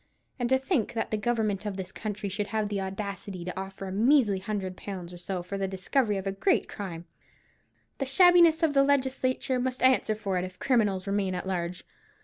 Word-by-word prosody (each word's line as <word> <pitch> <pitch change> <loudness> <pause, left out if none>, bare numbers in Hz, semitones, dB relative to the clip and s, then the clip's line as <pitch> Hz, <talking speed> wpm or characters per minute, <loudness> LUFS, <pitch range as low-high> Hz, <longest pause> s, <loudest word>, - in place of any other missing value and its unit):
And 240 -1 0
to 265 - +5
think 265 - -1
that 225 - -2
the - - +1
Government 215 -3 0
of 200 -2 -4
this 190 -1 -6
country 210 -1 -4
should 200 +1 -3
have 215 -2 -1
the 200 -1 -2
audacity 195 -2 -5
to 180 - -5
offer 195 +1 -6
a 190 - -5
measly 220 -1 +3
hundred 190 -2 -4
pounds 180 -3 -7
or 175 - -9
so 180 0 -4
for 195 +2 -5
the 195 - 0
discovery 205 +4 0
of 190 - -5
a 195 - 0
great 285 - +1
crime! 175 -5 -6 0.9
The 275 - 0
shabbiness 345 +1 +6
of 310 -3 +3
the 275 - +5
legislature 260 -2 +1
must 255 0 -2
answer 255 -4 +4
for 195 -4 -2
it, - - -2
if 185 0 -7
criminals 205 -7 +1
remain 195 -2 0
at - - -4
large. 180 -1 -3
205 Hz, 205 wpm, -28 LUFS, 190-255 Hz, 0.9 s, shabbiness